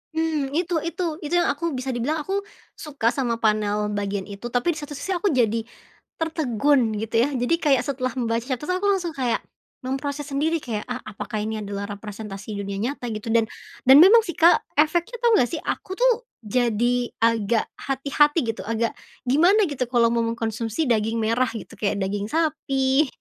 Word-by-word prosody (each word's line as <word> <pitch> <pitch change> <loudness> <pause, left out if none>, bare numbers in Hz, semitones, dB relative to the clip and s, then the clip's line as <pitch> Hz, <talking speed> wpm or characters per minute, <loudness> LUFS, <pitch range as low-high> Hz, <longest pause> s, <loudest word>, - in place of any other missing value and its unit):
Mmm, 315 -4 0
itu 355 0 -1 0.2
itu, 365 +1 -4 0.2
itu 300 +2 -5
yang 345 - +3
aku, 335 +4 -2
bisa 260 +1 -3
dibilang 255 +7 -1
aku 395 +1 -1 0.3
suka 275 -6 -1
sama 240 -4 -1
panel 210 -1 +1
bagian 200 -1 -2
itu, 200 +2 -9
tapi 245 +8 +1
di - - -9
satu 295 -1 -7
sisi 380 +7 -3
aku 365 +3 +1
jadi 230 - +2 0.6
tertegun 280 -7 +1
gitu 225 +2 -4
ya, 270 - +2
jadi 245 +7 +2
kayak 275 -5 +3
setelah 255 -2 -2
membaca, 230 -1 0
terus 275 +6 -3
aku 370 +3 0
langsung 365 -4 0
kayak, 255 -4 -1 0.4
memproses 280 +2 -3
sendiri, 310 +4 0
kayak, 225 -7 -4
"Ah 250 - -2
apakah 210 +1 -5
ini 215 +1 -3
adalah 200 0 -4
representasi 205 0 -7
dunia 200 0 -4
nyata?" 245 +3 -3
Gitu, 215 +1 -5
dan, 225 -1 +3 0.4
dan 265 - +9
memang 425 +6 +8
sih, 345 - -4
Kak, 340 +1 +6 0.2
efeknya 335 +9 +2
tau 475 - +5
nggak 245 - +3
sih, 320 -3 -4
aku 375 - -4
tuh 485 +1 +2 0.2
jadi 240 +2 +1 0.2
agak 230 -1 +2 0.2
hati-hati 285 +3 +2
gitu, 225 - -9
agak 230 0 0 0.4
gimana 355 +11 +5
gitu, 260 -3 -1
kalau 235 -1 +3
mau 235 - +1
mengkonsumsi 230 +3 -2
daging 225 0 +1
merah 230 +4 +2
gitu, 225 - -8
kayak 205 -1 0
daging 200 +2 -2
sapi, 280 -2 +1
250 Hz, 180 wpm, -24 LUFS, 220-305 Hz, 0.6 s, dan